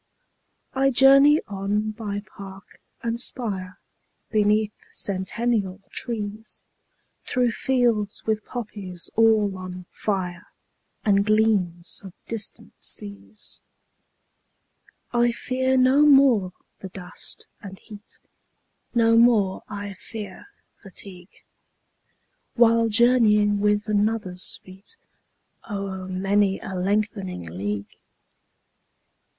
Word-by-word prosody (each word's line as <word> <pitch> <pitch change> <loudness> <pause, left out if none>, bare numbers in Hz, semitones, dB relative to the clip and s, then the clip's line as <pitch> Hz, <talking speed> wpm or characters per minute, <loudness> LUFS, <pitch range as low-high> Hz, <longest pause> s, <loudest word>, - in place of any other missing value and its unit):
20 270 0 +2
I - - +5
journey 275 +3 +6
on 205 +2 -1
by 205 -2 -5
park 195 0 -12 0.2
and 230 0 -1
spire, 195 -8 -2 0.5
Beneath 210 0 +2 0.2
centennial 200 0 -1
trees, 220 -2 -5 0.6
Through 250 -2 0
fields 235 -6 0
with 220 -1 0
poppies 200 -7 -6
all 220 -3 +4
on 185 0 -7
fire, 185 -4 -3 0.6
And 200 -2 +4
gleams 200 -5 +1
of 190 -3 -10
distant 220 -3 -4
seas. 100 0 -5 1.5
I 240 0 +3
fear 260 +2 0
no 260 +3 +5
more 265 -10 +5 0.3
the 190 - -8
dust 180 -1 -5
and 195 -1 -9
heat, 210 0 -12 0.8
25 - - -29
No 230 -1 +4
more 215 -5 +3
I 205 -1 -5
fear 205 - -9 0.3
fatigue, 190 -2 -9 1.1
While 230 -1 +4
journeying 210 -3 +4
with 210 0 +2
another's 210 -3 -1
feet 190 - -11 0.7
O'er 195 -2 -4
many 195 +1 +1
a 190 - -7
lengthening 195 - -1
league. 100 +4 -5
205 Hz, 95 wpm, -24 LUFS, 190-230 Hz, 1.5 s, journey